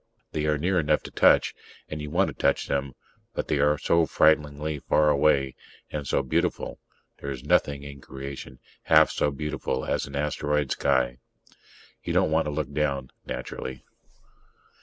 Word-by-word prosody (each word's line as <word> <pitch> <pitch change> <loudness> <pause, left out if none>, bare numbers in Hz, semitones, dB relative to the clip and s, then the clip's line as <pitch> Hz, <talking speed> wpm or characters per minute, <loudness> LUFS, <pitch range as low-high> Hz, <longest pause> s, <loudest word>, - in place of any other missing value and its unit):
They 75 0 -1
are 75 -1 +2
near 90 +5 +1
enough 75 -1 +1
to - - -9
touch, - - +4 0.3
and 75 -1 -5
you 75 - -5
want 90 +5 +2
to - - -6
touch - - +1
them, 70 -1 -1 0.4
but - - -2
they 70 - +1
are 75 +1 +3
so 85 +2 +2
frighteningly 75 -1 +2
far 75 +2 +3
away... 70 -2 +3 0.4
and 75 -2 -4
so 70 - +1
beautiful: 65 - -1 0.4
there's 70 -3 -5
nothing 70 -1 +2
in 70 -1 -9
creation 65 -2 -8 0.3
half - - +6
so - - +1
beautiful 75 +2 -3
as - - -1
an - - -8
asteroid 75 -1 0
sky. 65 -3 +1 0.8
You - - -2
don't 80 - +3
want 80 +1 +2
to 75 - -2
look 75 -2 -3
down, 70 -3 -1 0.2
naturally. 65 -1 -6
75 Hz, 160 wpm, -26 LUFS, 70-75 Hz, 0.8 s, half